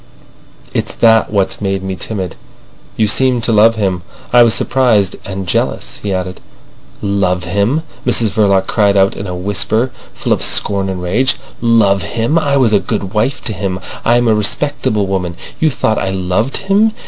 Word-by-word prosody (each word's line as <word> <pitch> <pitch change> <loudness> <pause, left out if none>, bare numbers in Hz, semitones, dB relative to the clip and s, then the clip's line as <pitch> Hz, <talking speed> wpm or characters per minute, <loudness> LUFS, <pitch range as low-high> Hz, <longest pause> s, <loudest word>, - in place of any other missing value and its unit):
"It's - - -2
that 115 -1 +4
what's 95 -2 0
made 95 -1 -2
me 95 0 -3
timid. 95 -3 -5 0.6
You 110 - +3
seemed 125 +2 +2
to 115 - +2
love 110 +1 +5
him. 95 -5 -1 0.3
I 120 - +7
was 115 -2 +5
surprised—and 100 -6 0
jealous," - - -2
he 100 - -3
added. 90 -1 -3 0.6
"Love 95 -3 0
him!" 100 - 0 0.2
Mrs 120 -3 +3
Verloc 100 -2 +2
cried 100 -1 +2
out 95 0 +3
in 100 - -6
a 90 - -4
whisper, 105 +6 0 0.2
full - - -1
of - - -2
scorn 100 -1 +1
and 90 -1 -4
rage. 125 +9 +1 0.3
"Love 110 -4 +3
him! 120 +8 0
I 140 -3 +1
was 120 -5 +3
a 100 - +5
good 95 0 -4
wife 115 +5 -1
to 110 - -1
him. 95 -2 -3 0.2
I 120 +1 +3
am 120 -1 +1
a 110 - +4
respectable 110 0 0
woman. 90 -3 -3 0.2
You 160 - +3
thought 110 -5 0
I 95 - -2
loved 95 +6 -1
him! 205 +3 +2
105 Hz, 175 wpm, -15 LUFS, 95-120 Hz, 0.6 s, I